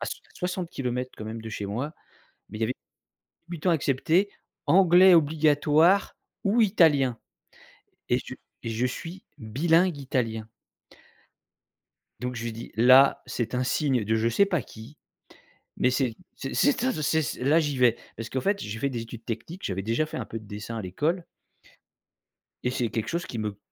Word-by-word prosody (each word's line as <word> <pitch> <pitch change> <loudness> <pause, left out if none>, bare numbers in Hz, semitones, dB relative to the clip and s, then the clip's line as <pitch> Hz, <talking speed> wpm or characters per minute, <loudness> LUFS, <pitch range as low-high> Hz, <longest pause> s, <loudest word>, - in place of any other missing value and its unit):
À - - -3
soi - - -5
60 135 -9 -3
quand 110 - -7
même 110 +1 -6
de 110 - -7
chez 105 -2 -5
moi, 125 +10 -3 0.6
mais 105 - -7
il - - -8
y - - +3
avait 125 +4 -1 0.7
débutant 175 +1 -1
accepté, 165 +5 +2 0.4
anglais 185 0 +7
obligatoire 155 +3 +3 0.3
ou 210 +4 +3
italien, 145 - +3 0.9
et - - +3
je - - -8 0.3
et - - -3
je 115 +2 0
suis 170 +8 -7
bilingue 160 +9 +2
italien 115 -5 -2 1.7
donc 125 +2 -4
je 115 - -5
lui 115 - -3
dis: 115 +1 -9
«Là, 130 +4 +6
c'est 120 0 -3
un 125 - +1
signe 130 -2 +1
de 110 +2 0
je 110 +1 +1
sais 200 - +4
pas 175 -6 0
qui, 115 +6 -13 0.8
mais - - +3
c'est 125 -3 0 0.2
c'est 135 - -6
c'est 280 -4 +2
un 260 - +2
de 155 - -4
ces 160 +2 +2
ces 125 - -4
là 155 +5 +4
j'y 145 -4 -1
vais» 125 -2 +4 0.2
parce 115 0 -6
qu'en 130 - -2
fait 200 +4 +1
j'ai 105 +2 -5
fait 140 - 0
des 120 -3 -4
études 115 0 -10
techniques. 140 - -6
J'avais 95 0 -2
déjà 115 +8 0
fait - - -7
un 120 - -4
peu 115 - -6
de 110 - -15
dessin 105 +3 -6
à - - -3
l'école 155 - -1 1.4
et 125 - 0
c'est 125 -2 -1
quelque 115 0 -3
chose 170 +1 -2
qui 115 - -6
me 105 -2 -3
130 Hz, 180 wpm, -26 LUFS, 115-165 Hz, 1.7 s, anglais